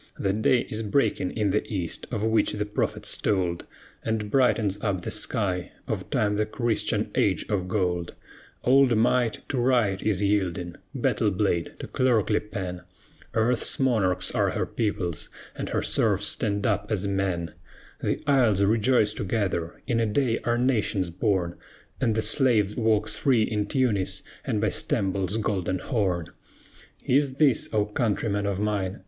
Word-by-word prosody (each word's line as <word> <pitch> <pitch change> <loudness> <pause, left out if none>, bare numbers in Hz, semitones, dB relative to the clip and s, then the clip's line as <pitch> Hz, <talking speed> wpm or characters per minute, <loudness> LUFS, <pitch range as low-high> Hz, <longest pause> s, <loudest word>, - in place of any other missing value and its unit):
The 95 - 0
day 115 +4 +3
is 110 - -4
breaking 110 -4 +1
in 105 -3 +1
the 105 - +1
East 90 -6 -3
of 110 -4 -3
which 110 0 +2
the 105 0 -2
prophets 105 - -1
told, 90 -4 -1 0.3
And 110 -2 -2
brightens 110 -6 +2
up 100 -4 -1
the - - -4
sky 90 -3 0
of - - -4
Time 105 0 +1
the 105 0 0
Christian 115 -1 -1
Age - - +1
of 95 -4 -1
Gold; 90 -3 -1 0.5
Old 130 -2 +4
Might 120 0 +1
to 135 - -1
Right 120 -6 +2
is 105 -2 0
yielding, 95 -3 0 0.2
battle 105 - +1
blade 95 -3 -1
to - - -7
clerkly 115 -5 +2
pen, 90 -4 -6 0.5
Earth's 115 +2 +2
monarchs 110 -9 +1
are - - +1
her - - -1
peoples, 95 -7 -3 0.3
and - - -4
her - - -1
serfs 105 -2 +2
stand 100 -2 +1
up 105 -1 0
as 105 -3 -1
men; 95 -4 -1 0.5
The - - -1
isles 120 -9 +3
rejoice 110 +1 +3
together, 95 -5 -2
in 120 -3 0
a 115 - +1
day 115 +2 +1
are 120 0 +1
nations 110 -7 0
born, 90 -2 -1 0.4
And 110 - +1
the 110 - +1
slave 110 -3 +3
walks 110 -2 +1
free 125 -6 +3
in 105 -2 -1
Tunis, 115 -8 0 0.2
and 105 - -1
by 110 0 +1
Stamboul's 95 0 -1
Golden 95 -4 -1
Horn! 90 - -1 0.8
Is 135 0 +2
this, 135 -6 +2
O 105 -2 +2
countrymen 105 -1 -1
of 100 -1 -2
mine! 105 -2 -1
105 Hz, 155 wpm, -26 LUFS, 95-115 Hz, 0.8 s, Old